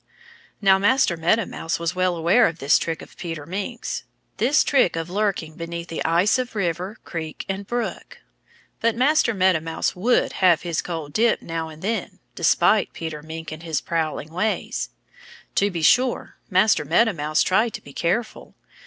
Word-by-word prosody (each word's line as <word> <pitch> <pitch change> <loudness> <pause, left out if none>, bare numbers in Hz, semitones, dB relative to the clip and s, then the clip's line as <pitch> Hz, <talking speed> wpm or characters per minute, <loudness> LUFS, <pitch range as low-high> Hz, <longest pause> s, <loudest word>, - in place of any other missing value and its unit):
Now, 190 -1 +6
Master 205 -2 +3
Meadow 175 +7 +2
Mouse 165 - -3
was 170 0 -2
well 185 -1 +1
aware 170 +9 +4
of 165 - -4
this 140 -1 +3
trick 165 -1 -3
of - - -15
Peter 165 -4 -6
Mink's 200 +7 -4 0.3
this 265 +7 +3
trick 260 - +3
of 165 +1 -4
lurking 195 -6 -1
beneath 170 +1 -6
the 165 - -3
ice 175 +9 +3
of 250 -2 -4
river, 185 +2 -2
creek 160 -3 -6
and 195 0 -4
brook. 240 0 -4 0.6
But 230 0 +1
Master 255 -2 +3
Meadow 185 -3 +3
Mouse 160 +1 -2
would 230 +7 +2
have 175 -4 +5
his 170 -2 -1
cold 160 -4 -6
dip 230 +5 +2
now 165 -1 -4
and 155 +1 -12
then 225 +3 -2 0.2
despite - - +3
Peter 160 -2 -6
Mink 160 +1 -7
and 155 0 -7
his 160 -4 -1
prowling 160 -2 -3
ways. 215 +5 -1 0.6
To 200 - +2
be 170 -4 -4
sure, 250 +8 +2
Master 190 -2 +3
Meadow 200 +9 +3
Mouse 155 -1 +1
tried 215 +4 +1
to - - -7
be 140 - -13
careful. 195 - -2
175 Hz, 170 wpm, -23 LUFS, 165-215 Hz, 0.6 s, Now